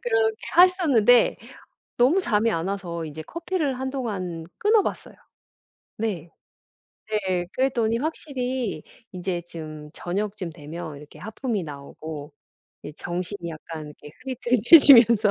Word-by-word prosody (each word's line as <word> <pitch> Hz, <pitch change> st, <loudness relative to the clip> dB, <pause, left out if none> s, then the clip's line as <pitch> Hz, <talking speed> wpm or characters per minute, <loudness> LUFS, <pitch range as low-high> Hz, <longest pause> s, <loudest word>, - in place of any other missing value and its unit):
그렇게 470 Hz, -2 st, +1 dB, 0.2 s
했었는데 290 Hz, -, +5 dB, 0.6 s
너무 275 Hz, +11 st, +4 dB
잠이 225 Hz, -, +1 dB
안 165 Hz, -2 st, -2 dB
와서 175 Hz, -4 st, -4 dB
이제 155 Hz, 0 st, -7 dB
커피를 320 Hz, -, -3 dB
한동안 210 Hz, -11 st, -4 dB
끊어 425 Hz, 0 st, +4 dB
봤어요. -, -, -5 dB, 0.8 s
네. 190 Hz, -7 st, -3 dB, 1.0 s
네. 175 Hz, -1 st, 0 dB
그랬더니 235 Hz, -4 st, +1 dB
확실히 255 Hz, -, -3 dB, 0.3 s
인제 180 Hz, -1 st, -3 dB
좀 155 Hz, -3 st, -9 dB
저녁쯤 195 Hz, +1 st, -4 dB
되면 160 Hz, 0 st, -8 dB
이렇게 150 Hz, +1 st, -13 dB
하품이 220 Hz, -2 st, -3 dB
나오고 145 Hz, +1 st, -8 dB, 0.5 s
예 150 Hz, -, -7 dB
정신이 175 Hz, +2 st, -5 dB
약간 155 Hz, -1 st, -8 dB
이렇게 150 Hz, -, -11 dB
흐릿흐릿해지면서 240 Hz, -3 st, +6 dB
205 Hz, 275 characters per minute, -24 LUFS, 165-260 Hz, 1.0 s, 흐릿흐릿해지면서